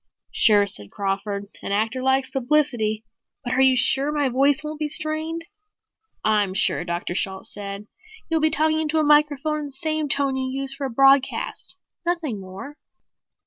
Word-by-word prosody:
"Sure," 205 -2 +4
said 105 - -3
Crawford. 200 0 -3 0.2
"An - - -5
actor 220 +5 0
likes 265 0 +1
publicity. 245 -6 0 0.4
But 245 - -2
are 260 - +2
you 265 -1 +5
sure 270 +4 +3
my 290 -3 0
voice 275 +3 +3
won't 305 0 -6
be 305 - -1
strained?" 315 +2 -2 0.8
"I'm 205 -3 +1
sure," 185 - +1
Dr. 175 0 -3
Shalt 190 +1 -1
said. 200 0 -7 0.4
"You'll 325 -2 0
be 315 - +3
talking 315 +1 +1
into 315 0 -1
a 310 - +3
microphone 300 0 +2
in 300 - -5
the 285 - -8
same 310 +1 -2
tone 275 -1 +1
you 260 0 -2
use 270 0 -3
for 275 0 -4
a - - -7
broadcast. 270 +2 +2 0.3
Nothing 340 - -2
more." 195 +11 -10
270 Hz, 170 wpm, -23 LUFS, 215-300 Hz, 0.8 s, you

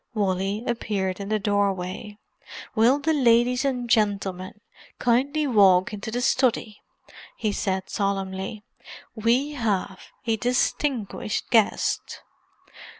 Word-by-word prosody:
Wally 195 +1 -1
appeared 200 -5 -2
in 200 0 -5
the 215 - +2
doorway. 200 0 -2 0.6
"Will 235 +5 +4
the 310 +2 0
ladies 245 -2 +3
and 250 -3 -1
gentlemen 200 -3 0 0.4
kindly 275 +6 +1
walk 200 -5 +4
into 210 +1 -5
the 240 +2 -2
study?" 245 -4 +1 0.6
he 215 - -1
said 190 -2 -2
solemnly. 195 +1 -3 0.5
"We 240 +6 +1
have 205 -8 -2 0.3
a 225 -2 +1
distinguished 245 -2 -1
guest." 225 -3 +1
215 Hz, 105 wpm, -24 LUFS, 195-245 Hz, 0.6 s, Will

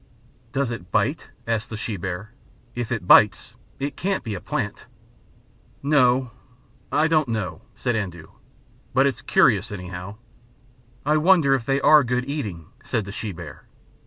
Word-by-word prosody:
"Does 135 -3 -1
it 90 -7 -7
bite?" - - 0 0.2
asked 115 -1 -1
the 110 - -5
she 110 -1 -3
bear. 95 +3 -5 0.4
"If 120 0 -4
it 110 -7 -2
bites 105 +3 +5 0.2
it 140 0 -3
can't 195 +1 -1
be 110 - -4
a 95 - -5
plant." - - -4 1.0
"No 130 -4 +3 0.6
I 150 +3 +3
don't 155 -3 +2
know," 95 -8 -3
said 125 -2 -1
Andoo. 90 -6 -5 0.6
"But 135 +1 +5
it's 135 -5 0
curious, - - +3
anyhow." 90 0 -7 0.9
"I 150 +1 +3
wonder 160 -4 +5
if 125 -4 -1
they 135 0 +2
are 150 0 +7
good 125 +1 -1
eating?" 105 - -4 0.2
said 110 - -2
the 100 - -7
she 105 +1 -4
bear. 80 -5 -10
115 Hz, 155 wpm, -23 LUFS, 100-140 Hz, 1.0 s, are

